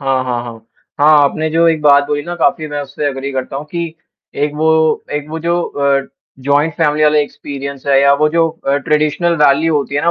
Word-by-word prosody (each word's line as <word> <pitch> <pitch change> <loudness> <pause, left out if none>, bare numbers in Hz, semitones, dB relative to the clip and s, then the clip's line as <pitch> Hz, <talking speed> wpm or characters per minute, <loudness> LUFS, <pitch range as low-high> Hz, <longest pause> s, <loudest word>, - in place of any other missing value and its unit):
हाँ, 135 -2 0
हाँ, 120 -1 -2
हाँ। 120 - -8 0.5
हाँ, 150 +1 +6
आपने 155 +3 0
जो 165 +1 +2
एक 160 -1 0
बात 145 -1 +5
बोली 145 0 -2
ना 175 +3 -6
काफ़ी 160 -1 0
मैं 145 0 -4
उससे 145 +2 -5
अग्री 135 0 -3
करता 130 0 -4
हूँ 140 - -5
कि 170 -2 -4 0.5
एक 150 - -3
वो 155 +1 0 0.4
एक 145 0 -3
वो 160 +1 -5
जो 170 +2 -1
अ, 140 -2 -1 0.4
जॉइंट 145 +4 +1
फैमिली 150 -1 +1
वाला 150 0 +3
एक्सपीरियंस 140 -1 -5
है 135 -1 +4
या 140 0 +5
वो 155 - +4
जो 165 +1 +1 0.2
अ, 140 +1 +2
ट्रेडिशनल 155 +3 0
वैल्यू 150 +3 +3
होती 140 -1 -3
है 145 - 0
ना, 170 - +2
145 Hz, 220 wpm, -15 LUFS, 140-160 Hz, 0.5 s, हाँ